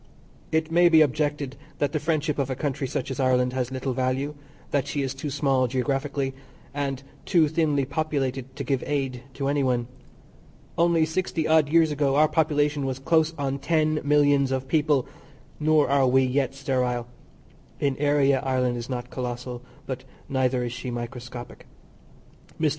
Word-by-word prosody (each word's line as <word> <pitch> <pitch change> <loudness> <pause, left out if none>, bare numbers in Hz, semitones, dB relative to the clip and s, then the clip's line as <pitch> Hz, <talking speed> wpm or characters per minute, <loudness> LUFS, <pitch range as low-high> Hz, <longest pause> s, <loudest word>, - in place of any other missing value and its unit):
It 160 0 0
may 175 +1 +5
be 160 -2 +6
objected 145 -1 -1 0.2
that 145 -1 0
the 155 - -1
friendship 155 -1 -1
of 135 -1 0
a 130 - -1
country 135 -1 -2
such 130 - -3
as 135 - -5
Ireland 125 -1 +2
has 125 -2 -1
little 130 0 -2
value; 130 +3 -1 0.4
that 140 -2 +1
she 145 - -1
is 135 -1 -2
too 140 +2 -5
small 135 -2 +1
geographically, 135 +2 -1 0.4
and 140 -2 -3 0.2
too 165 -5 +3
thinly 150 -3 +1
populated 135 -3 -2
to 140 - -4
give 135 -1 -1
aid 135 -4 -2
to 135 -1 -2
any 145 0 +1
one. 125 -3 +1 0.9
Only 170 -1 +3
sixty 160 -1 -1
odd 155 -2 +4
years 160 0 +4
ago 140 -2 +1
our 155 +1 +5
population 150 -2 +1
was 130 -1 -2
close 160 +3 +2
on 140 -1 -2
ten 155 -1 +1
millions 145 -2 +3
of 130 0 -2
people, 145 -2 +2 0.5
nor 155 -1 +3
are 135 -1 +3
we 130 +1 +4
yet 130 +1 0
sterile; 125 -3 -1 0.7
in 140 -2 +1
area 140 -2 +3
Ireland 125 -2 0
is 120 +2 -6
not 125 -1 -4
collossal, 125 -1 -5 0.2
but 130 -1 -5 0.2
neither 130 -2 +1
is 120 -1 -3
she 125 0 -5
microscopic. 120 0 -7 0.9
Mr. 155 -1 +3
140 Hz, 165 wpm, -25 LUFS, 130-150 Hz, 0.9 s, be